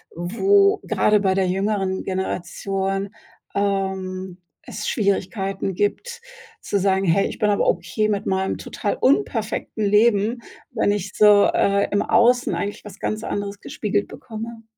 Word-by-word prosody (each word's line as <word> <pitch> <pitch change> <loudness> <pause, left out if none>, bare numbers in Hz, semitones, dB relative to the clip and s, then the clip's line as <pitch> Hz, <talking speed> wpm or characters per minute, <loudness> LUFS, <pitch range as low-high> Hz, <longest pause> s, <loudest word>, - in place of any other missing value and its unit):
wo 395 - +3
gerade 210 0 +2
bei 190 -2 +2
der 190 -1 +1
jüngeren 195 0 -1
Generation, 195 +1 -3 0.5
ähm, 190 -2 -2 0.3
es - - -6
Schwierigkeiten 195 -2 -1
gibt 470 - -2 0.4
zu 200 - -1
sagen: 190 0 +1
„Hey, 185 +3 +3
ich - - -7
bin 210 - +2
aber 205 - +1
okay 180 +4 0
mit 205 0 -1
meinem 190 0 -1
total - - -3
unperfekten 230 - 0
Leben, 210 +2 +3 0.3
wenn 225 -4 +1
ich 205 -1 -3
so, 210 -1 +6
äh, 200 0 +2
im 205 - +2
Außen 245 +1 +3
eigentlich 205 +1 -4
was 205 -2 -11
ganz 215 +1 -3
anderes 205 -1 -4
gespiegelt 205 -1 -2
bekomme.“ 225 0 -8
200 Hz, 140 wpm, -22 LUFS, 190-215 Hz, 0.5 s, so